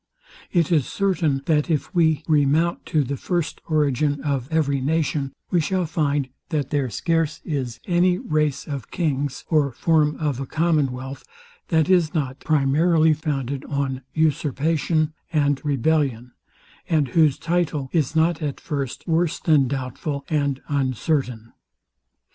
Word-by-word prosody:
It 170 Hz, -2 st, +2 dB
is 150 Hz, -6 st, +3 dB
certain, 165 Hz, -9 st, 0 dB
that 150 Hz, 0 st, +1 dB
if 155 Hz, +2 st, -1 dB
we 160 Hz, -3 st, +2 dB
remount 155 Hz, +2 st, +2 dB
to 155 Hz, -2 st, +2 dB
the 140 Hz, +2 st, -3 dB
first 170 Hz, -1 st, -2 dB
origin 145 Hz, -2 st, +1 dB
of 140 Hz, -4 st, -1 dB
every 140 Hz, -4 st, +1 dB
nation, 150 Hz, -1 st, 0 dB, 0.2 s
we 175 Hz, -, +3 dB
shall 185 Hz, +3 st, 0 dB
find, 145 Hz, -4 st, 0 dB, 0.2 s
that 145 Hz, -4 st, -2 dB
there 140 Hz, -4 st, 0 dB
scarce 165 Hz, +4 st, 0 dB
is 130 Hz, -7 st, -3 dB
any 180 Hz, 0 st, +3 dB
race 150 Hz, -5 st, -1 dB
of 140 Hz, -3 st, -6 dB
kings, 145 Hz, -5 st, -2 dB
or 150 Hz, -4 st, +3 dB
form 150 Hz, +4 st, +2 dB
of 145 Hz, -5 st, -1 dB
a 135 Hz, -, -4 dB
commonwealth, 140 Hz, -5 st, -1 dB, 0.4 s
that 160 Hz, -3 st, +2 dB
is 175 Hz, -4 st, +3 dB
not 135 Hz, -3 st, -2 dB
primarily 155 Hz, +2 st, +3 dB
founded 140 Hz, -3 st, -3 dB
on 135 Hz, -2 st, -2 dB
usurpation 155 Hz, +1 st, +1 dB, 0.2 s
and 145 Hz, -3 st, +1 dB
rebellion, 140 Hz, -4 st, 0 dB, 0.6 s
and 150 Hz, -5 st, +2 dB
whose 155 Hz, 0 st, +3 dB
title 165 Hz, -5 st, -1 dB
is 160 Hz, -1 st, 0 dB
not 160 Hz, +1 st, +2 dB
at 145 Hz, -3 st, -3 dB
first 140 Hz, -3 st, -4 dB
worse 165 Hz, 0 st, +1 dB
than 150 Hz, -5 st, +3 dB
doubtful 140 Hz, +2 st, -4 dB
and 140 Hz, -3 st, 0 dB
uncertain. 130 Hz, -4 st, -1 dB
150 Hz, 135 wpm, -23 LUFS, 135-160 Hz, 0.6 s, is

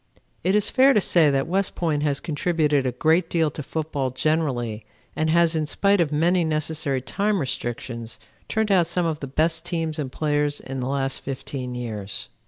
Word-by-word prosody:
It 185 Hz, +4 st, +2 dB
is 210 Hz, -, +3 dB
fair 265 Hz, +1 st, +6 dB
to 210 Hz, -, +4 dB
say 170 Hz, -5 st, +4 dB
that 135 Hz, -1 st, +1 dB
West 190 Hz, +3 st, 0 dB
Point 155 Hz, -4 st, 0 dB
has 145 Hz, -2 st, 0 dB
contributed 150 Hz, -4 st, +1 dB
a -, -, 0 dB
great 160 Hz, +6 st, +2 dB
deal 160 Hz, -3 st, +1 dB
to 150 Hz, -, -6 dB
football 145 Hz, -2 st, -2 dB
generally 130 Hz, -6 st, -1 dB, 0.3 s
and 155 Hz, 0 st, 0 dB
has, 170 Hz, 0 st, +3 dB
in 155 Hz, -1 st, 0 dB
spite 200 Hz, +4 st, +2 dB
of 155 Hz, -3 st, 0 dB
many 170 Hz, +4 st, +2 dB
necessary 155 Hz, -4 st, -1 dB
time 205 Hz, +8 st, 0 dB
restrictions, 120 Hz, -4 st, -4 dB, 0.3 s
turned 220 Hz, -1 st, 0 dB
out 180 Hz, -4 st, +4 dB
some 170 Hz, +1 st, 0 dB
of 160 Hz, -2 st, -1 dB
the 140 Hz, -, -5 dB
best 160 Hz, +4 st, +1 dB
teams 165 Hz, -3 st, -2 dB
and 135 Hz, -3 st, -3 dB
players 145 Hz, 0 st, 0 dB
in 135 Hz, 0 st, -6 dB
the 125 Hz, +1 st, -2 dB
last 135 Hz, -1 st, -1 dB
fifteen 130 Hz, -2 st, -5 dB
years. 105 Hz, -5 st, -5 dB
155 Hz, 190 wpm, -24 LUFS, 135-170 Hz, 0.3 s, fair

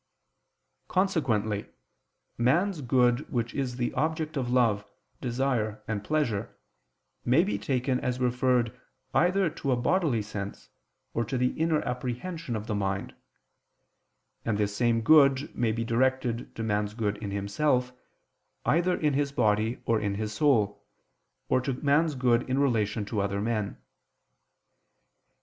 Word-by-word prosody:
Consequently 120 Hz, -, 0 dB, 0.7 s
man's 165 Hz, +9 st, +2 dB
good 125 Hz, +1 st, +2 dB
which 120 Hz, -2 st, -1 dB
is 130 Hz, -3 st, -2 dB
the 120 Hz, -1 st, -2 dB
object 155 Hz, 0 st, -1 dB
of 130 Hz, -4 st, -1 dB
love, 115 Hz, -5 st, +2 dB, 0.4 s
desire 120 Hz, -4 st, -1 dB
and 105 Hz, -2 st, -2 dB
pleasure, 120 Hz, -7 st, -1 dB, 0.7 s
may 130 Hz, +8 st, +4 dB
be 200 Hz, -, -2 dB
taken 130 Hz, -1 st, 0 dB
as 125 Hz, 0 st, -2 dB
referred 125 Hz, -1 st, +1 dB, 0.4 s
either 185 Hz, +2 st, +3 dB
to 140 Hz, -3 st, -3 dB
a -, -, +4 dB
bodily 125 Hz, -, +1 dB
sense, 100 Hz, -1 st, -7 dB, 0.4 s
or 115 Hz, -, 0 dB
to 115 Hz, +4 st, -3 dB
the 125 Hz, 0 st, +2 dB
inner 160 Hz, +1 st, 0 dB
apprehension 125 Hz, +4 st, -4 dB
of 105 Hz, -1 st, -4 dB
the 110 Hz, -, -3 dB
mind: 95 Hz, -1 st, -2 dB, 1.3 s
and 110 Hz, -3 st, 0 dB
this 105 Hz, -1 st, -1 dB
same 115 Hz, 0 st, +2 dB
good 140 Hz, +1 st, +5 dB
may 120 Hz, -2 st, +1 dB
be 115 Hz, +1 st, -2 dB
directed 125 Hz, 0 st, 0 dB
to 115 Hz, -, -4 dB
man's 105 Hz, -1 st, -1 dB
good 105 Hz, -3 st, -1 dB
in 105 Hz, -1 st, -5 dB
himself, 125 Hz, +6 st, 0 dB, 0.7 s
either 175 Hz, +2 st, +2 dB
in 150 Hz, -2 st, +1 dB
his 140 Hz, 0 st, 0 dB
body 110 Hz, -2 st, +1 dB
or 115 Hz, -1 st, +2 dB
in 100 Hz, -1 st, -1 dB
his 110 Hz, +1 st, -3 dB
soul, 105 Hz, -6 st, +2 dB, 0.6 s
or 130 Hz, -, +2 dB
to 135 Hz, +1 st, -2 dB
man's 150 Hz, +3 st, +2 dB
good 125 Hz, -2 st, +3 dB
in 130 Hz, -, +1 dB
relation 110 Hz, -6 st, +1 dB
to 105 Hz, 0 st, -1 dB
other 100 Hz, 0 st, -1 dB
men. 105 Hz, -1 st, -2 dB
125 Hz, 140 wpm, -28 LUFS, 110-140 Hz, 1.3 s, good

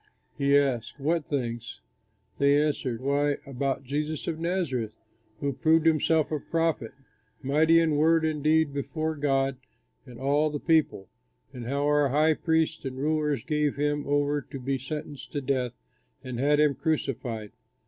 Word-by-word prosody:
He 140 Hz, 0 st, +3 dB
asked, 135 Hz, -2 st, -1 dB
"What 160 Hz, +3 st, 0 dB
things?" 120 Hz, -5 st, -3 dB, 0.6 s
They 140 Hz, +1 st, +4 dB
answered, 140 Hz, -5 st, -1 dB
"Why, 140 Hz, +1 st, +1 dB
about 135 Hz, 0 st, -2 dB
Jesus 150 Hz, +3 st, -3 dB
of 160 Hz, -1 st, -3 dB
Nazareth, 165 Hz, -, -1 dB, 0.5 s
who 140 Hz, -1 st, -1 dB
proved 160 Hz, +3 st, +3 dB
himself 160 Hz, -1 st, +3 dB
a 155 Hz, -, -1 dB
prophet, 165 Hz, -7 st, -1 dB, 0.5 s
mighty 155 Hz, +5 st, +4 dB
in 160 Hz, -2 st, +2 dB
word 160 Hz, +1 st, +4 dB
and 155 Hz, -2 st, -2 dB
deed 155 Hz, -1 st, +3 dB
before 155 Hz, +3 st, -2 dB
God 135 Hz, -2 st, 0 dB, 0.5 s
and 125 Hz, -2 st, -11 dB
all 145 Hz, +3 st, +2 dB
the 145 Hz, -1 st, -4 dB
people, 155 Hz, -, +1 dB, 0.5 s
and 120 Hz, -3 st, -7 dB
how 140 Hz, +2 st, 0 dB
our 145 Hz, -1 st, +3 dB
high 155 Hz, +4 st, +3 dB
priests 160 Hz, 0 st, 0 dB
and 130 Hz, -1 st, -5 dB
rulers 150 Hz, 0 st, 0 dB
gave 150 Hz, -2 st, 0 dB
him 145 Hz, 0 st, -1 dB
over 145 Hz, 0 st, +1 dB
to 135 Hz, 0 st, -9 dB
be 135 Hz, +1 st, -2 dB
sentenced 145 Hz, +1 st, -7 dB
to 145 Hz, -, -1 dB
death 130 Hz, -3 st, -1 dB, 0.5 s
and 130 Hz, -2 st, -5 dB
had 145 Hz, +2 st, +3 dB
him 150 Hz, -2 st, +4 dB
crucified. 125 Hz, -9 st, -2 dB
145 Hz, 155 wpm, -27 LUFS, 135-155 Hz, 0.6 s, They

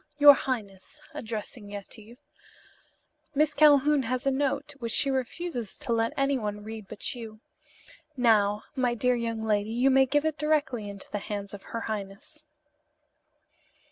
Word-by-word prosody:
"Your 290 Hz, 0 st, +10 dB
highness," 225 Hz, -2 st, -5 dB
addressing 220 Hz, -4 st, -6 dB
Yetive, 210 Hz, +3 st, -9 dB, 1.2 s
"Miss 300 Hz, +1 st, +3 dB
Calhoun 295 Hz, -1 st, +5 dB
has 255 Hz, +2 st, -2 dB
a 275 Hz, -, +3 dB
note 280 Hz, +2 st, -1 dB
which 230 Hz, -2 st, -3 dB
she 275 Hz, -, +3 dB
refuses 260 Hz, -, -3 dB
to 235 Hz, -, -2 dB
let 230 Hz, 0 st, +1 dB
anyone 235 Hz, -7 st, -1 dB
read 220 Hz, -1 st, -8 dB
but 210 Hz, +6 st, -4 dB
you. 225 Hz, -3 st, -9 dB, 0.8 s
Now, 215 Hz, -4 st, +3 dB
my 250 Hz, -2 st, +1 dB
dear 250 Hz, +2 st, +2 dB
young 230 Hz, -2 st, -2 dB
lady, 210 Hz, -1 st, 0 dB
you 245 Hz, +4 st, +2 dB
may 265 Hz, 0 st, +5 dB
give 290 Hz, +3 st, +1 dB
it 315 Hz, -1 st, -1 dB
directly 285 Hz, -8 st, 0 dB
into 200 Hz, -1 st, -8 dB
the 205 Hz, -, -2 dB
hands 200 Hz, 0 st, -5 dB
of 200 Hz, -, -8 dB
her 230 Hz, -, -4 dB
highness." 215 Hz, +9 st, -6 dB
235 Hz, 145 wpm, -28 LUFS, 210-275 Hz, 1.2 s, Your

